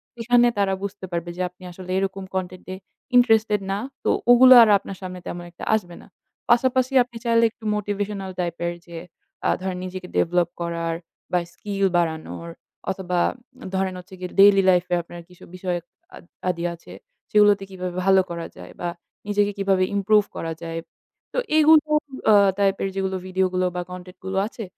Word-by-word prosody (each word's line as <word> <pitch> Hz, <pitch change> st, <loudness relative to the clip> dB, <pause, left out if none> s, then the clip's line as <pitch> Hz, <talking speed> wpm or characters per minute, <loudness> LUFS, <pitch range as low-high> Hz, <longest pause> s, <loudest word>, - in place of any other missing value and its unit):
সেখানে 240 Hz, +1 st, +3 dB
তারা 195 Hz, -1 st, +2 dB
বুঝতে 200 Hz, -1 st, -5 dB
পারবে 170 Hz, 0 st, -3 dB
যে -, -, -3 dB
আপনি 180 Hz, +1 st, -20 dB
আসলে 185 Hz, +1 st, -9 dB
এরকম 195 Hz, 0 st, -2 dB
content 185 Hz, -1 st, -4 dB
এ -, -, -5 dB, 0.4 s
interested 225 Hz, -4 st, +4 dB
না। 195 Hz, -, 0 dB, 0.3 s
তো -, -, +1 dB, 0.2 s
ওগুলো 255 Hz, +1 st, +9 dB
আর 220 Hz, -, +3 dB
আপনার 195 Hz, -1 st, -9 dB
সামনে 185 Hz, -1 st, -6 dB
তেমন 175 Hz, 0 st, -5 dB
একটা 170 Hz, -, -12 dB
আসবে 175 Hz, -5 st, -4 dB
না। -, -, -17 dB, 0.4 s
পাশাপাশি 255 Hz, +2 st, +3 dB
আপনি 240 Hz, -1 st, -12 dB
চাইলে 230 Hz, 0 st, +3 dB
একটু 225 Hz, -, -25 dB
motivational 205 Hz, -2 st, -3 dB
type 170 Hz, -1 st, -2 dB
এর 175 Hz, -, -2 dB
যে 170 Hz, -1 st, -9 dB, 0.5 s
আ -, -, +3 dB
ধরেন 185 Hz, -1 st, -3 dB
নিজেকে 185 Hz, 0 st, -7 dB
develop 175 Hz, 0 st, +2 dB
করার 165 Hz, -1 st, -2 dB, 0.4 s
বা 180 Hz, -, +3 dB
skill 200 Hz, -1 st, -2 dB
বাড়ানোর, 165 Hz, 0 st, -3 dB, 0.4 s
অথবা 180 Hz, -2 st, -2 dB, 0.4 s
আ -, -, -8 dB
ধরেন 190 Hz, 0 st, 0 dB
হচ্ছে 180 Hz, -, -14 dB
গিয়ে 180 Hz, -, -5 dB
daily 195 Hz, -1 st, +7 dB
life 180 Hz, 0 st, +3 dB
এ -, -, +5 dB
আপনার 170 Hz, +1 st, -10 dB
কিছু 180 Hz, -, -17 dB
বিষয়ক 180 Hz, -2 st, -3 dB, 0.3 s
আদ -, -, -13 dB, 0.3 s
আদি 170 Hz, -1 st, -2 dB
আছে, 170 Hz, -, -13 dB, 0.4 s
সেগুলোতে 205 Hz, -2 st, +5 dB
কিভাবে 180 Hz, -1 st, -6 dB
ভালো 190 Hz, -1 st, +6 dB
করা 170 Hz, -1 st, -5 dB
যায় 90 Hz, -, -11 dB
বা 175 Hz, -, -1 dB, 0.4 s
নিজেকে 205 Hz, 0 st, +1 dB
কিভাবে 195 Hz, -1 st, +2 dB
improve 205 Hz, +1 st, +3 dB
করা 165 Hz, 0 st, -4 dB
যায়। 165 Hz, 0 st, -4 dB, 0.5 s
তো -, -, -4 dB, 0.2 s
এইগুলো 310 Hz, 0 st, +7 dB, 0.5 s
অ -, -, +7 dB, 0.3 s
type 195 Hz, -1 st, +2 dB
এর 195 Hz, -, 0 dB
যেগুলো 190 Hz, 0 st, -1 dB
video 185 Hz, 0 st, +1 dB
গুলো 185 Hz, 0 st, +1 dB
বা 180 Hz, -, -1 dB
content 180 Hz, 0 st, -10 dB
গুলো 190 Hz, 0 st, -3 dB
আছে 230 Hz, -, -8 dB
190 Hz, 180 wpm, -23 LUFS, 180-205 Hz, 0.5 s, ওগুলো